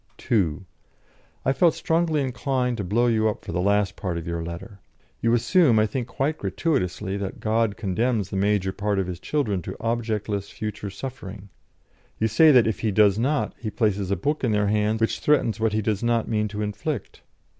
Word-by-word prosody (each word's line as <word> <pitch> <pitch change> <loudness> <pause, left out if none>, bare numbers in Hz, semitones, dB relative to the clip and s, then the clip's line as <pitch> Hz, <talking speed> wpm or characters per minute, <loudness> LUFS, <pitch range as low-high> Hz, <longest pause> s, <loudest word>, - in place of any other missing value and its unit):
"(2) 95 -5 0 0.8
I 135 - +3
felt 165 +4 +3
strongly 165 -2 +1
inclined 125 -1 -1
to 105 - -3
blow 110 +6 +1
you 110 -2 +2
up 105 - -6
for - - -5
the 85 +2 -1
last 100 +1 +1
part 90 -3 -3
of 85 - -5
your 85 -1 -3
letter. 85 +5 -8 0.4
You 115 - +2
assume, 135 0 +4
I 110 - +4
think 120 +3 -3
quite 140 +4 -2
gratuitously, 100 - -1
that 100 -1 -5
God 110 -1 0
condemns 105 0 -1
the - - -3
major 100 -1 +1
part 105 0 -1
of 95 - +1
His 90 -1 -6
children 105 -7 -1
to - - -7
objectless 110 -3 -2
future 105 -1 -5
suffering. 105 -3 -8 0.7
You 110 - +2
say 135 +9 +5
that 125 -5 +6
if 110 -2 -1
He 110 - 0
does 105 0 +4
not, 145 +5 0
He 110 - -4
places 105 -3 0
a 100 - +2
book 145 - -2
in 115 -4 +2
their 105 -1 +2
hands 105 +1 +1
which 115 - +1
threatens 135 -7 +2
what 110 -1 +1
He 110 0 0
does 105 -1 -1
not 120 -1 +1
mean 105 -1 0
to 105 +1 -4
inflict. 105 +4 -4
110 Hz, 200 wpm, -24 LUFS, 100-120 Hz, 0.8 s, that